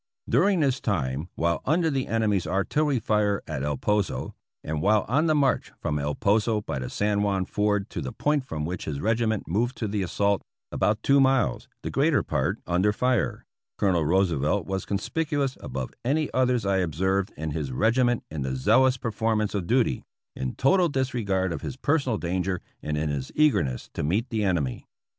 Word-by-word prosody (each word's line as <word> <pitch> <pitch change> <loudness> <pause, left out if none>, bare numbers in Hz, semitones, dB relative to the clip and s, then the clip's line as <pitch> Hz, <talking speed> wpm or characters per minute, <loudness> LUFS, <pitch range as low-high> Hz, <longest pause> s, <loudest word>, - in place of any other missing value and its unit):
During 195 -4 +3
this 135 -2 +1
time, 75 - -1
while 85 0 0
under 160 +2 +2
the 135 -2 -1
enemy's 105 -5 +1
artillery 135 +9 +1
fire 105 -3 +1
at 65 - -4
El 75 0 -1
Poso, 105 +6 -1 0.3
and 75 -1 -3
while 105 +4 +3
on 150 +8 +2
the 155 - +3
march 145 -2 +1
from 75 0 -1
El 70 +1 -2
Poso 105 +2 +2
by 70 - -4
the 65 - -4
San 105 0 0
Juan 100 -2 +1
ford 105 -1 0
to 85 - -4
the 65 -3 -4
point 150 -2 0
from 80 -11 -4
which 90 +2 -4
his 70 -3 -3
regi 115 +4 +1
ment 110 -2 -1
moved 120 +9 0
to 110 - -2
the 100 0 -1
assault 100 +2 +1 0.2
— - - -66
about 105 +3 0
two 140 0 +5
miles, 130 - +2 0.2
the - - -3
greater - - +2
part - - -1
under 90 +4 +2
fire 125 +1 0 0.2
— - - -66
Colonel 90 -5 +2
Roosevelt 85 0 +1
was 95 0 -3
conspicuous 140 +5 -1
above 65 -2 -5
any 145 +5 0
others 125 -3 +2
I 100 -1 +2
observed 95 +3 0
in 80 0 -3
his 75 -3 -3
regiment 120 - +2
in 75 -2 -4
the 65 0 -2
zealous 125 - +4
perform 115 -2 0
ance 105 - -2
of 95 -4 -2
duty, 120 - +1 0.3
in 65 -1 -4
total 175 +5 +3
disregard 105 - -1
of 80 - -5
his - - -5
personal 140 -5 +1
danger 90 +1 -1 0.2
and 75 0 -2
in 75 0 -1
his 70 -2 -3
eagerness 140 - +1
to - - -3
meet 100 - 0
the 110 -2 0
enemy. 85 -10 -1
100 Hz, 195 wpm, -26 LUFS, 85-125 Hz, 0.3 s, two